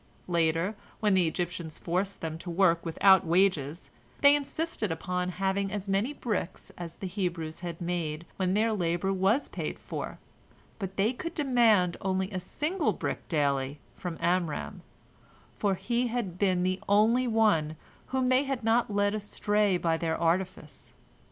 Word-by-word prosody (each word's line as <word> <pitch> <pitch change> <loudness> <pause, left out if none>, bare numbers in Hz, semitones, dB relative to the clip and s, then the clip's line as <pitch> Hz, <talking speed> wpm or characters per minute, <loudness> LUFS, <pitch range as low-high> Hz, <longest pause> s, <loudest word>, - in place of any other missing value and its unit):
Later, 170 +2 +1 0.3
when 210 -2 +2
the 185 -3 +4
Egyptians 170 -1 -3
forced 190 +3 -2
them 160 0 -4
to 175 - -7
work 170 -1 +3
without 190 +3 +5
wages, 170 -3 +1 0.3
they 285 0 +8
insisted 290 - -2
upon 180 +2 -2
having 195 +1 0
as 205 -1 -4
many 195 +7 +1
bricks 220 - -4
as 170 -2 -7
the - - -7
Hebrews 175 -4 -3
had 170 -2 -6
made 170 -2 -3
when 185 0 +1
their 220 +1 +2
labor 175 0 0
was 195 +8 +2
paid - - -4
for, - - -6 0.6
but 195 -2 -5
they 210 +5 +2
could 335 +7 -6
demand 230 - +3
only 190 +1 -1
a 185 - -2
single 310 - -1
brick - - -4
daily 140 -3 0 0.2
from 175 -3 -5
Amram, 175 -3 -1 0.8
for 200 -2 +2
he 235 +6 0
had 225 -7 -3
been 185 -3 +2
the 185 +1 0
only 225 +5 +4
one 210 -10 +2 0.3
whom 260 -1 0
they 260 +2 +3
had 270 -3 -3
not 225 0 +2
led 205 0 +2
astray 210 -1 +1
by 165 -2 +1
their 160 -1 -1
artifice. 170 -2 -2
190 Hz, 155 wpm, -29 LUFS, 170-215 Hz, 0.8 s, they